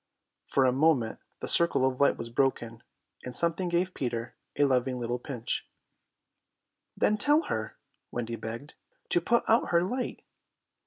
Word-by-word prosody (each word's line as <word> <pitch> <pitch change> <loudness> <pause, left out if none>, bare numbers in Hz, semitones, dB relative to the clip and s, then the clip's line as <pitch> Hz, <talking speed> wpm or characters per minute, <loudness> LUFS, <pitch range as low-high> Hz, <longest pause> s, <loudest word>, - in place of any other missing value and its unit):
For 135 - +3
a 130 - +4
moment 135 -4 +2 0.2
the - - -3
circle 170 -6 +4
of 130 0 -1
light 140 - +4
was 115 0 -6
broken, 120 -3 0 0.4
and 125 -1 -7
something 170 +3 0
gave 175 +2 0
Peter 120 -2 -3 0.2
a - - +4
loving 130 -2 +1
little 120 +1 -2
pinch. 120 -2 -4 1.3
"Then 215 - +3
tell 295 +8 +4
her," 110 -1 -4 0.3
Wendy 120 -1 -3
begged, 115 +6 -7 0.4
"to 175 - +3
put 235 +7 +2
out 225 +1 +3
her 170 0 +3
light." 250 +7 -3
130 Hz, 150 wpm, -29 LUFS, 120-170 Hz, 1.3 s, a